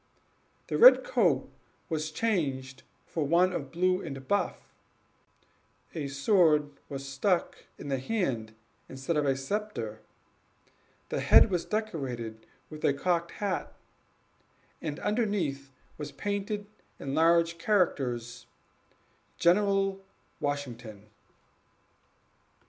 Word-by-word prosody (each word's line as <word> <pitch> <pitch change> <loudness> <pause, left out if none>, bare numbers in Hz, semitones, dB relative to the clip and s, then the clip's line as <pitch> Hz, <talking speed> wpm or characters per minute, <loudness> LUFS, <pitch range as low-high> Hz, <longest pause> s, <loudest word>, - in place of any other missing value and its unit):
The - - -2
red - - +9
coat - - +2 0.4
was 155 -2 -2
changed 140 -10 -1 0.2
for 160 - -2
one 175 +5 +3
of 140 -6 -4
blue 185 +2 +1
and 135 -4 -7
buff, 200 - -1 1.2
a 150 -4 -3
sword 150 0 +3 0.2
was 135 0 -7
held 185 -4 +2 0.2
in - - -7
the 135 -1 0
hand 130 - -2 0.3
instead 135 +5 -3
of 150 -1 +1
a 135 -1 +2
sceptre, 135 - -4 1.1
the - - -1
head 215 - +6
was 175 -2 0
decorated 130 - -4 0.2
with 155 0 -9
a 140 - +3
cocked 170 +2 0
hat, 195 -4 -3 1.1
and 150 -3 -4
underneath 200 - -1 0.3
was 145 -1 -5
painted 205 +7 -3 0.3
in 135 - -5
large 170 +1 +3
characters, 125 - 0 0.9
GENERAL 195 +1 +2 0.4
WASHINGTON. 120 -8 -5
155 Hz, 105 wpm, -29 LUFS, 135-190 Hz, 1.2 s, red